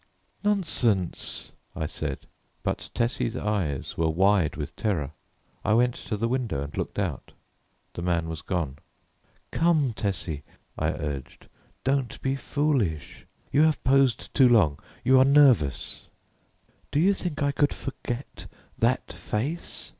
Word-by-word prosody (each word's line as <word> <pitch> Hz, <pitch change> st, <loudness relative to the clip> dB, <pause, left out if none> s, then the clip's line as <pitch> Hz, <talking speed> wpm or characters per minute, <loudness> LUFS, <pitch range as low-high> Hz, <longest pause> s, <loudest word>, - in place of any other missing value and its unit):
"Nonsense," 130 Hz, -, 0 dB, 0.2 s
I 80 Hz, -, -2 dB
said, 75 Hz, -3 st, -4 dB, 0.4 s
but -, -, -2 dB
Tessie's 115 Hz, -1 st, 0 dB
eyes 100 Hz, -, -2 dB
were 80 Hz, -1 st, +3 dB
wide 95 Hz, 0 st, +3 dB
with -, -, -5 dB
terror. 85 Hz, -10 st, -1 dB, 0.5 s
I 105 Hz, -, +2 dB
went 120 Hz, +1 st, +4 dB
to 110 Hz, -, -4 dB
the 115 Hz, -, 0 dB
window 115 Hz, -, -1 dB
and 70 Hz, +1 st, -8 dB
looked -, -, -3 dB
out. -, -, -3 dB, 0.6 s
The -, -, -5 dB
man 85 Hz, -2 st, 0 dB
was 80 Hz, -1 st, -5 dB
gone. 75 Hz, -7 st, -2 dB, 0.7 s
"Come, 155 Hz, -7 st, +3 dB
Tessie," 90 Hz, -8 st, -2 dB, 0.3 s
I -, -, 0 dB
urged, 70 Hz, -3 st, -5 dB, 0.4 s
"don't 135 Hz, -2 st, 0 dB
be 135 Hz, 0 st, +1 dB
foolish. 130 Hz, -, -1 dB, 0.2 s
You 145 Hz, -, +4 dB
have 155 Hz, -2 st, +3 dB
posed 135 Hz, -2 st, +3 dB
too 130 Hz, -3 st, +6 dB
long; 95 Hz, -12 st, +4 dB, 0.2 s
you 130 Hz, +1 st, +6 dB
are -, -, +8 dB
nervous." 130 Hz, -, +4 dB, 0.8 s
"Do 145 Hz, -, +1 dB
you 190 Hz, +5 st, +5 dB
think 170 Hz, -6 st, -3 dB
I 140 Hz, -, +2 dB
could 145 Hz, +1 st, +2 dB
forget 130 Hz, -1 st, -6 dB, 0.3 s
that -, -, +1 dB
face?" 140 Hz, +11 st, -4 dB
115 Hz, 135 wpm, -27 LUFS, 80-135 Hz, 0.8 s, are